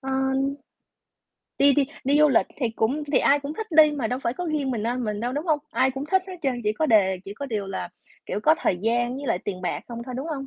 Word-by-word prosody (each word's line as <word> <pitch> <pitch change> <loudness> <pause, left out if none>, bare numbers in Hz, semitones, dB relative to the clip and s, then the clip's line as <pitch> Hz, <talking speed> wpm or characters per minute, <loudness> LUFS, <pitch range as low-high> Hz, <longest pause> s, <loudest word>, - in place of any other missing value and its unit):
Ơ, 270 0 -5
ưm. 265 +1 +1 1.1
Đi 280 0 +6
đi 280 0 +2 0.2
đi 280 +3 +3
du 300 0 +6
lịch 260 - +3
thì 250 -5 0
cũng 230 +7 -1
thì - - +5
ai 285 +1 +3
cũng 285 +2 -5
thích 445 - -5
đi 310 -2 +6
mà 275 -6 -2
đâu 250 +3 -2
phải 235 -3 -1
có 355 +5 -4
riêng 300 -4 -1
miền 230 -4 -2
Nam 245 +2 -1
mình 210 -1 -3
đâu, 240 +2 -2
đúng 295 +5 -3
hông? 310 -3 +2
Ai 265 - +2
cũng 270 +2 -5
thích 380 +4 +2
hết 375 -1 -7
trơn, 260 -4 -1
chỉ 210 - +2
có 315 +8 0
đề 195 -7 +4
chỉ 200 - -8
có 280 +6 -6
điều 215 -6 -3
là, 195 - -4 0.4
kiểu, - - -3
có 310 +8 +5
thời 180 - 0
gian 240 +3 +1
với 280 +1 -6
lại 225 -7 +1
tiền 185 -1 -5
bạc 175 - -2
hông 235 -1 -6
thôi, 250 +1 -7
đúng 270 +4 -4
hông? 275 -4 -4
265 Hz, 280 wpm, -25 LUFS, 230-290 Hz, 1.1 s, Đi